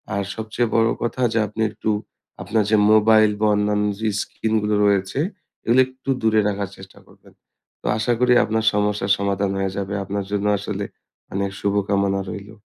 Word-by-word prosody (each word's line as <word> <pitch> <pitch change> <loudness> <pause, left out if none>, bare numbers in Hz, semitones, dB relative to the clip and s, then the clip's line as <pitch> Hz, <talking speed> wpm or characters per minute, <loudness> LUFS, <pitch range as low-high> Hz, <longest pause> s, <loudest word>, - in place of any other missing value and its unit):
আর 100 - 0
সবচেয়ে 110 +2 -2
বড় 115 0 +4
কথা 120 +2 -2
যে 115 - +2
আপনি 110 +2 -6
একটু 110 +1 -4 0.5
আপনার 105 +3 +1
যে 110 - +5
মোবাইল 110 0 +5
বা 110 - +2
অন্যান্য 105 0 +1
যে 110 - -1
স্ক্রিন 110 0 -3
গুলো 105 0 0
রয়েছে, 100 +5 +1 0.5
এগুলো 120 +3 +4
একটু 130 +1 -11
দূরে 110 -1 +3
রাখার 100 -1 -2
চেষ্টা 95 0 -14
করবেন। - - -21 0.5
তো - - -18
আশা 115 +2 +1
করি 125 0 +4
আপনার 110 +1 -1
সমস্যার 105 -1 0
সমাধান 100 0 -1
হয়ে 95 -1 -1
যাবে। 100 0 -3
আপনার 100 0 -4
জন্য 105 0 -1
আসলে - - -4 0.5
অনেক 100 0 -1
শুভকামনা 100 -1 +1
রইলো। 105 +2 -8
105 Hz, 170 wpm, -22 LUFS, 100-110 Hz, 0.5 s, যে